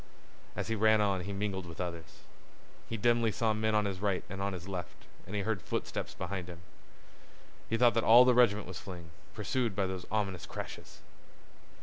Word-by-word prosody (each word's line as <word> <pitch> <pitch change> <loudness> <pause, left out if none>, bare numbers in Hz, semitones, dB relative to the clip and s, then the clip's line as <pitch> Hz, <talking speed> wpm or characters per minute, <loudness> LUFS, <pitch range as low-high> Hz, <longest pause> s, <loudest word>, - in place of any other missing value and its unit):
As - - -3
he 115 - 0
ran 110 0 +4
on 100 -3 +1
he 100 - -4
mingled 100 -2 -3
with 85 - -10
others. 85 -3 -6 0.7
He 115 - -2
dimly 115 +1 +3
saw 110 +2 +1
men 110 0 0
on 105 -1 +3
his 95 -2 -3
right 100 -2 0
and 95 0 -5
on 100 0 0
his 90 0 -7
left, 90 -4 -6 0.2
and 100 - -5
he 100 - 0
heard 110 -2 -1
footsteps - - -4
behind 95 -3 -4
him. 90 -1 -8 1.1
He 115 - +1
thought 120 0 +5
that 115 - +1
all 120 +3 +8
the 125 - +5
regiment 110 -4 +4
was 95 - -7
fleeing, 85 -3 -9 0.2
pursued 120 -6 -1
by 100 -1 +1
those 95 -1 -5
ominous 100 -5 -1
crashes. - - -8
100 Hz, 195 wpm, -32 LUFS, 95-110 Hz, 1.1 s, all